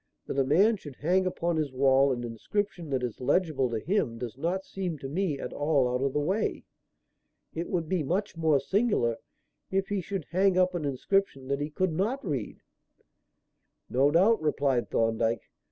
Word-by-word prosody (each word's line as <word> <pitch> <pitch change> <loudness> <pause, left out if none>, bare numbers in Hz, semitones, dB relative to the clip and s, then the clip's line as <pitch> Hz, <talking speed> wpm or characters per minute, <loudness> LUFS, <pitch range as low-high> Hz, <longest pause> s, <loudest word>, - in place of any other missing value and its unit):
"That 140 - -2
a - - +4
man 195 - +4
should 145 -7 -10
hang 185 +6 +1
upon 170 -2 -1
his 150 -3 -1
wall 135 +1 +4
an 120 -1 -2
inscription 170 - -3
that 130 -2 -1
is 120 -1 -4
legible 145 -1 +1
to 115 - -2
him 145 - 0
does 120 -1 -6
not 175 +7 -2
seem 180 -5 -4
to 135 - -7
me 160 0 -1
at - - -5
all 145 -3 +2
out 125 +1 -1
of 140 - +1
the - - +1
way. 190 +9 -1 0.9
It 170 +2 -4
would 170 -3 -1
be 185 0 0
much 185 +7 -1
more 160 -3 +3
singular 190 - +1 0.5
if 195 0 0
he 205 -2 0
should 185 -2 -4
hang 190 +1 +3
up 185 0 +3
an 170 -4 -2
inscription 140 0 0
that 140 +1 0
he 145 - -2
could 175 +3 -1
not 215 - -1
read." 135 - -3 1.3
"No 135 +3 +4
doubt," 195 +9 +4
replied 140 -5 +1
Thorndyke. 115 0 +1
155 Hz, 185 wpm, -28 LUFS, 135-185 Hz, 1.3 s, a